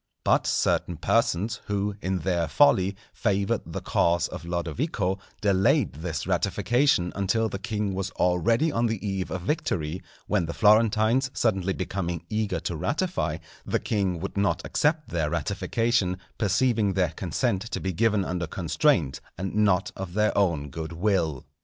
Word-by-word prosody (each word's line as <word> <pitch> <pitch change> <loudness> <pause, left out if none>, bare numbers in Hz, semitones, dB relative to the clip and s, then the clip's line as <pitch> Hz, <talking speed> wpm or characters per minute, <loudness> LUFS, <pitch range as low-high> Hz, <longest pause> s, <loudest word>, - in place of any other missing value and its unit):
But - - +3
certain 85 - +1
persons, 105 +10 +1
who, 100 0 -1
in 95 0 -1
their 85 -3 0
folly, 95 - +4 0.2
favoured 100 0 0
the - - -5
cause 85 0 +2
of - - -8
Lodovico, 90 - -2 0.2
delayed 100 -8 +3
this 80 +2 -4
ratification 120 -8 +1
until 100 +3 +1
the 100 - -5
king 105 -2 -2
was 95 0 -2
already 115 - +2
on 120 -3 +1
the 110 -2 -3
eve 95 -2 -2
of 95 - -4
victory; 90 - -2 0.2
when 95 -6 0
the 85 - -5
Florentines 110 +4 +4
suddenly 95 -4 +1
becoming 90 -3 -3
eager 105 -1 -1
to 85 - -3
ratify, 90 - -1 0.3
the - - 0
king 95 -5 -1
would 95 +4 -5
not 100 0 +1
accept 155 +1 0
their 80 -3 -1
ratification, 95 - 0 0.2
perceiving 110 0 +2
their 90 -3 +1
consent 95 - -1
to - - -3
be 95 0 -2
given 105 +1 +2
under 90 -2 -2
constraint 85 - +1 0.2
and 95 +2 -4
not 100 -3 +2
of 95 -1 -6
their 105 0 +2
own 80 -8 +1
good 80 +2 -5
will. 85 -6 0
95 Hz, 155 wpm, -26 LUFS, 85-110 Hz, 0.3 s, folly